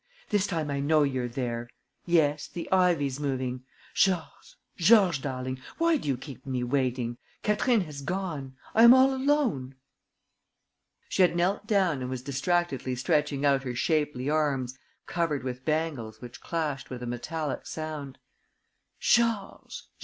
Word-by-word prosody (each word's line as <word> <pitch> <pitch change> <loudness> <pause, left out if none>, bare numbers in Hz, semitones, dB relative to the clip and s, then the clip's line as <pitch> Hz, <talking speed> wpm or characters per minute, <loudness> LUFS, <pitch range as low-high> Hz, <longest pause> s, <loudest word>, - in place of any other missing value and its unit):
"This 205 -2 +2
time 160 -5 -2
I 140 - -1
know 150 +2 +3
you're 130 -3 -1
there! 120 -1 -4 0.4
Yes, 150 -4 +2
the 170 - -6
ivy's 165 -8 +2
moving. 130 -3 -2 0.3
Georges, 185 -4 0 0.2
Georges 180 - +5
darling, 130 -1 -4 0.2
why 335 -1 +3
do 265 - -7
you 135 -3 +1
keep 130 0 -10
me 130 -2 -2
waiting? 125 -2 -1 0.2
Catherine 210 +2 +2
has 150 -5 -7
gone. 150 -5 -4 0.2
I 225 - +4
am 235 +2 +10
all 265 +1 +5
alone...." 260 - 0 1.3
She - - 0
had 180 -2 +4
knelt 190 +4 0
down 190 - +2
and 125 - -3
was 130 -1 -4
distractedly 140 -1 -1
stretching 145 +1 0
out 140 -1 +4
her 125 -2 -5
shapely 150 -2 0
arms 140 -4 0 0.3
covered 165 -6 -1
with 125 0 -5
bangles 150 -9 -2
which 120 -1 -10
clashed 155 -5 -3
with 125 -1 -6
a - - -3
metallic 145 +5 -4
sound: 155 -4 -6 0.8
"Georges!... 230 -4 +1
145 Hz, 145 wpm, -28 LUFS, 130-175 Hz, 1.3 s, am